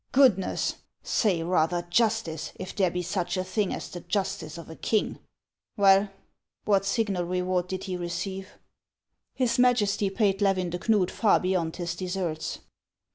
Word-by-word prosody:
"Goodness? 250 -9 +3 0.3
Say, 185 -7 +1
rather, 175 0 +1
justice, 175 -4 0
if 185 - -7
there 190 -3 +3
be 180 +1 -3
such 175 0 -2
a 185 - 0
thing 190 +1 -1
as - - -4
the 175 - -7
justice 170 -5 -3
of 170 - -9
a 160 - -9
king! 215 +4 0 0.6
Well, 195 0 +5 0.6
what 195 -1 +2
signal 195 -4 0
reward 180 0 0
did 190 0 -4
he 185 -2 -3
receive? 190 +3 -5 0.2
" - - -65
" - - -55
His 250 -2 +1
Majesty 215 -5 +3
paid 195 -1 +1
Levin 185 -3 +2
de 175 - -3
Knud 205 -3 +2
far 220 - +3
beyond 180 -3 -1
his 175 -1 -3
deserts." 180 -3 -3
185 Hz, 160 wpm, -27 LUFS, 175-205 Hz, 0.6 s, Well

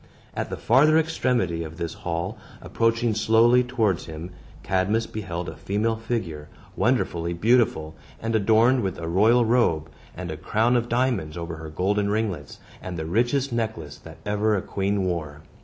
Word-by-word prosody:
At - - -3
the - - -4
farther 150 +6 +4
extremity 125 - 0
of 80 0 -9
this 85 -2 -4
hall, 85 +5 -3 0.2
approaching 115 0 0
slowly 115 +3 +4
towards 115 -8 0
him, 80 +3 -7 0.3
Cadmus 100 +4 +1
beheld 90 -6 -5
a - - -6
female 110 +3 -1
figure, 105 -10 -4 0.3
wonderfully 85 0 0
beautiful, 85 -6 +2 0.3
and 115 0 -2
adorned 115 +4 +4
with 95 -3 -2
a 80 - -5
royal 110 +8 +4
robe, 85 -10 +1 0.3
and 90 -2 -5
a 80 - -5
crown 110 +9 +1
of 120 0 0
diamonds 120 -11 0
over 85 -1 -5
her 80 0 -8
golden 100 +5 0
ringlets, 100 - -2 0.2
and 90 -2 -6
the 80 - -4
richest 120 - 0
necklace 110 -11 -3
that - - -12
ever 105 +1 +1
a 95 - -2
queen 100 0 -1
wore. 75 -5 -3
105 Hz, 160 wpm, -24 LUFS, 85-115 Hz, 0.3 s, farther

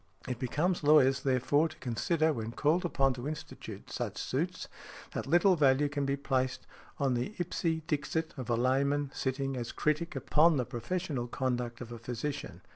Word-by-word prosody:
It 125 -2 -3
becomes 160 +8 0
lawyers, 135 -3 +5
therefore, 140 +4 +2
to - - -13
consider, 155 +6 +1
when 115 -2 -4
called 160 +7 +2
upon 135 -6 +2
to 125 +2 -5
institute 155 0 -7
such - - -3
suits, - - -2 0.4
that - - -4
little 175 +5 +5
value 145 -2 +4
can 140 -1 -1
be 140 - +1
placed 130 -2 -1 0.3
on 135 -2 +1
the 125 - -2
ipse 165 -2 -1
dixit 160 +1 -1
of 130 -4 -6
a 120 - +3
layman 135 +3 +1
sitting 135 0 -2
as 120 -2 -4
critic 155 +2 0
upon 155 +4 +4
the 125 - 0
professional 140 +1 -3
conduct 125 -1 -2
of 120 -1 -7
a 120 - -7
physician. 120 - -5
140 Hz, 170 wpm, -31 LUFS, 125-155 Hz, 0.4 s, lawyers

